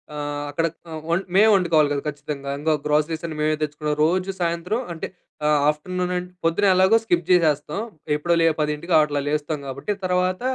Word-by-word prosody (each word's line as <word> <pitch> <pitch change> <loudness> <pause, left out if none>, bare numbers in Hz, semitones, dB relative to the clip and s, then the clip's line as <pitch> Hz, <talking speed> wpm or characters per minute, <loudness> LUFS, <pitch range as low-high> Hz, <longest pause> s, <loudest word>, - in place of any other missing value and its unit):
ఆహ్, 145 0 -4
అక్కడ 165 +3 -1 0.2
ఆహ్, 160 -1 -6
వం 170 +2 +2 0.2
మేమే 210 +3 +7
వండుకోవాలి 165 -6 +3
గదా! 140 -1 -1
ఖచ్చితంగా. 145 -1 -5
ఇంగ 155 +2 0
గ్రాసరీస్ 155 +2 0
అన్ని 160 -2 -5
మేమే 155 0 +2
తెచ్చుకున్నాం. 150 0 -2
రోజు 185 +3 0
సాయంత్రం 170 +7 -1
అంటే 160 - -5 0.4
ఆహ్, 150 -1 +4
ఆఫ్టర్‌నూన్ 180 +4 -2
అం 180 0 -2 0.2
పొద్దున 170 +5 +2
ఎలాగో 190 +4 +5
స్కిప్ 175 -6 +1
చేసేస్తాం. 155 -1 +2 0.4
ఎప్పుడో 170 +3 +1
లే - - +4
10కి 150 +3 -1
అట్లా 150 -1 +1
లేస్తాం 150 +1 -1
గాబట్టి 135 +10 -3
తర్వాత 185 +2 0
160 Hz, 170 wpm, -23 LUFS, 150-180 Hz, 0.4 s, మేమే